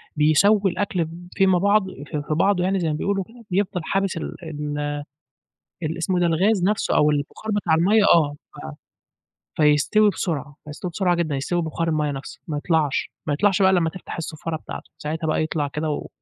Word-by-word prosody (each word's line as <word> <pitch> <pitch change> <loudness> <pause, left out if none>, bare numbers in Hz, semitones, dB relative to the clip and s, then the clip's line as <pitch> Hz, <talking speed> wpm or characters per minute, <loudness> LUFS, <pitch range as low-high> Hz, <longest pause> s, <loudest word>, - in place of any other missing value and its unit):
بيسوّي 190 +6 +4
الأكل 185 -2 -1
ب 170 +2 -10
فيما 190 -2 +4
بعض 200 +1 +3 0.2
في 150 -2 -4
في - - 0
بعضه 180 +3 +2
يعني 195 +1 +1
زي 170 - -1
ما 155 - 0
بيقولوا 195 +5 -1
كده، 230 +4 -16
بيفضل 185 -1 0
حابس 195 0 -1
ال - - -5
ال 150 -2 -4 1.1
ال 160 +2 -2
اسمه 180 +2 0
إيه - - +1
ده 175 - +3
الغاز 185 +4 +2
نفسُه 210 +2 +1
أو 150 0 +4
البُخار 150 +9 -3
بتاع 185 -6 +2
المَيَّة، 200 +6 +4
آه، 150 -4 +2 1.2
ف - - 0
فيستوي 150 +9 +4
بسرعة، 145 -7 -3
يستوي 155 +4 -6
بسرعة 180 0 +1
جدًا، 160 -4 -1
يستوي 175 +6 -1
ببُخار 165 +1 -2
المَيَّة 150 -2 0
نفسه 135 0 -8
ما 150 - -2
يطلعش، 150 -2 0 0.2
ما 145 - +1
يطلعش 195 +5 +2
بقى 190 - +6
إلّا 185 - +4
أمّا 165 -1 +1
تفتح 185 - -8
الصفارة 160 0 -4
بتاعتُه، - - -9
ساعتها 160 +2 -3
بقى 155 - +1
يطلع 155 -2 -1
كده 150 +3 -3
و 150 - -3
165 Hz, 195 wpm, -23 LUFS, 150-190 Hz, 1.2 s, بقى